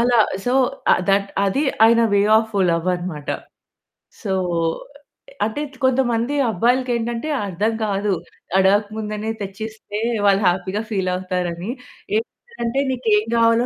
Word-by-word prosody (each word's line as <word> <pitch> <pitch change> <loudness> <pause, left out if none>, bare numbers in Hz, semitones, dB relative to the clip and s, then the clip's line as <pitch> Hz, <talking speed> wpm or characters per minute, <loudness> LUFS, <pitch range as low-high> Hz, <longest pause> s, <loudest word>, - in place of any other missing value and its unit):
అలా 240 -1 +4 0.3
so, 250 - +2 0.6
that 200 0 +2 0.2
అది 275 +10 +1 0.2
ఆయన 230 0 +5 0.2
వే 200 - +4 0.2
ఆఫ్ 220 -1 -8 0.2
లవ్ 170 +2 -1
అనమాట. 170 -5 -6 1.0
సో, 195 -2 -1 1.1
అంటే 220 +7 -3 0.2
కొంతమంది 255 0 +2
అబ్బాయిలకేంటంటే 240 - 0 0.2
అర్థం 205 +4 -1
కాదు. 200 0 0 0.5
అడగక 200 +2 +4
ముందనే 215 0 -3
తెచ్చిస్తే 210 +1 -6 0.3
వాళ్ళు 200 0 +4
హ్యాపీగా 185 +3 0
ఫీల్ 190 -3 0
అవుతారని. 180 +1 -3 0.5
ఏంటిదంటే, 360 - -3
"నీకేం 220 -5 +2
గావాలో 230 +1 +4
215 Hz, 110 wpm, -21 LUFS, 195-235 Hz, 1.1 s, ఆయన